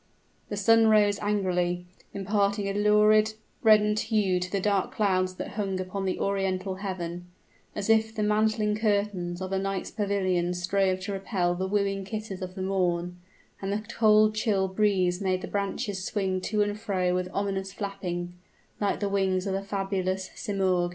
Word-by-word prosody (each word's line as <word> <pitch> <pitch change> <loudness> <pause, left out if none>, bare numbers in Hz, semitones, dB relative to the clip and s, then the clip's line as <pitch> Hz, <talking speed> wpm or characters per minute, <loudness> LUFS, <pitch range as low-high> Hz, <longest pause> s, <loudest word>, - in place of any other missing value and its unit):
The 205 - -3
sun 225 +3 +5
rose 210 -2 +4
angrily, 180 -4 0 0.3
imparting 200 +1 0
a 195 - -1
lurid, 210 +1 +4 0.3
reddened 210 -1 +5
hue 210 -5 +1
to 180 0 -4
the 200 - 0
dark 200 -1 +1
clouds 185 -3 +1
that - - -5
hung 195 -3 -2
upon 185 +1 -3
the 185 - -1
Oriental 190 -1 -1
heaven, 175 -3 -5 0.5
as 205 - -3
if 220 0 +3
the 215 - -1
mantling 210 0 +2
curtains 200 -5 -1
of 185 - -5
a 190 - +1
night's 195 0 -3
pavilion 185 -4 0
strove 185 +1 +1
to 200 +2 -4
repel 190 -2 0
the 185 +2 -2
wooing 195 -1 0
kisses 210 -1 -6
of 185 0 -6
the 190 - -4
morn; 180 -2 0 0.4
and 195 0 -2
the 210 +1 -2
cold 215 -1 +5
chill 210 -3 +1
breeze 190 -2 +1
made 185 -1 0
the - - -4
branches 200 0 -2
swing 190 -2 -1
to 210 +2 +1
and 205 0 -3
fro 185 -5 0
with 180 0 -1
ominous 195 -1 -2
flapping, 185 -3 -4 0.5
like 205 0 0
the 205 - +1
wings 190 -1 +1
of 195 - -1
the 195 - -1
fabulous 195 -1 -2
Simoorg. 190 -5 0
195 Hz, 170 wpm, -27 LUFS, 185-210 Hz, 0.5 s, sun